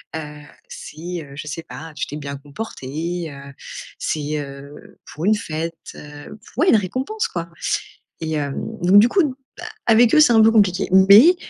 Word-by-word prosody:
Heu, 150 -1 -7 0.3
si, 170 +3 -7
heu, 140 - -14
je 145 +2 -7
sais 160 +3 -5
pas, 155 +5 -10
tu - - -2
t'es 145 - -6
bien 140 -1 -6
comporté, 160 +1 -5
heu, 140 0 -11 0.5
c'est, 150 0 -2
heu 140 +1 -11
pour 155 - -6
une 215 +2 +4
fête, 165 -4 -4 0.2
heu 145 +6 -11 0.2
oui 330 - +2
une - - +6
récompense 255 - -1
quoi 170 -1 -5 0.7
et 160 -1 -3
hem, 145 -2 -2 0.3
donc 185 +3 +6
du 225 - +5
coup, 375 +9 +3 0.3
bah - - -9 0.2
avec 230 0 +5
eux, 310 - +6
c'est 295 -5 +6
un 225 - +5
peu 225 - +6
compliqué. 200 -5 +2
Mais 200 - +8
165 Hz, 175 wpm, -21 LUFS, 145-210 Hz, 0.7 s, Mais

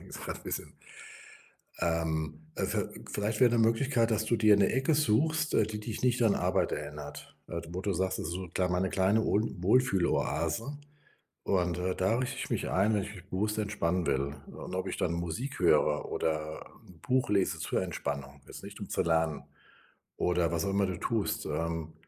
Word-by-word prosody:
ist - - -8
halt - - -5
bisschen - - -5 1.0
ähm, 80 -2 -1
äh, - - 0
viel - - -3
vielleicht 105 +1 -1
wäre 125 -2 +7
'ne 120 - +3
Möglichkeit, 115 +1 +3
dass 110 0 +1
du 115 +1 +2
dir 110 -1 +6
'ne 100 - +4
Ecke 135 +4 +2
suchst, 155 +4 +2
äh, - - +5
die 105 0 -5
dich 110 +2 -5
nicht 125 -1 +3
an 110 - +4
Arbeit - - +1
erinnert, - - -6
äh, 85 -1 -4
d 85 - -12
wo 90 - -3
du 100 -1 0
sagst: 95 +2 0
„Das - - -3
ist 85 - -3
so 90 0 -5
kl 90 -1 +1
meine 90 +1 +1
kleine 100 +4 +3
Wohl 105 - +3 0.2
Wohlfühloase, 115 +4 +1 0.7
und, 90 -3 +1
äh, 90 +1 -1
da 95 +4 +2
richte 125 0 -2
ich - - -4
mich - - -1
ein, 100 +4 +3
wenn 100 - +1
ich 105 - -7
mich 95 0 -13
bewusst 105 +3 -1
entspannen 90 -5 0
will, 70 +1 0
und - - -8
ob 95 +1 -2
ich - - -3
dann 85 - 0
Musik 85 - -3
höre 75 -3 +3
oder 80 -1 -2 0.2
'n 90 -3 -16
Buch 130 +3 +1
lese 100 -2 +2
zur - - 0
Entspannung, 70 -1 -4
ist - - -10
nicht, - - -9
um - - -7
zu - - +1
lernen.” 80 -3 +1 0.7
Oder 90 -2 +1
was 85 -1 0
auch 100 - 0
immer 100 0 +2
du 90 -3 -3
tust, 110 +1 -1
ähm, 80 -1 -2
95 Hz, 200 wpm, -30 LUFS, 85-110 Hz, 1.0 s, wäre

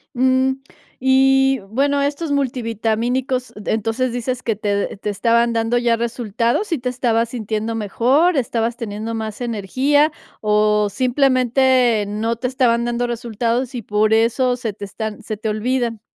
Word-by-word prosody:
Mm, 260 +1 +3 0.5
y, 270 0 +4
bueno, 280 +5 +1
estos 285 +2 -2
multivitamínicos, 245 0 -1
d 210 - -4
entonces 225 +3 -1
dices 245 +1 -3
que 225 -4 -1
te 205 0 -1
d 200 - -2
te 210 - -4
estaban 235 +3 +2
dando 230 +1 +1
ya 240 -1 +2
resultados, 235 - -1
¿sí 330 -5 -1
te 250 +1 -2
estabas 235 -2 0
sintiendo 225 -1 -3
mejor, 255 - +2
estabas 235 -1 -1
teniendo 220 0 -5
más 220 0 -5
energía 260 +7 +1 0.3
o, 210 0 +2
simplemente, 255 -2 +2
no 220 +3 -1
te 250 +2 -3
estaban 245 -2 +1
dando 240 0 -1
resultados?, 240 +1 -2
y 240 - -3
por 215 +2 +1
eso 245 +3 +2
se 230 -4 -4
te 200 0 -7
están 215 +2 -6
se 215 -1 -5
te 220 0 -3
olvidan. 230 +1 -1
235 Hz, 150 wpm, -20 LUFS, 220-255 Hz, 0.5 s, y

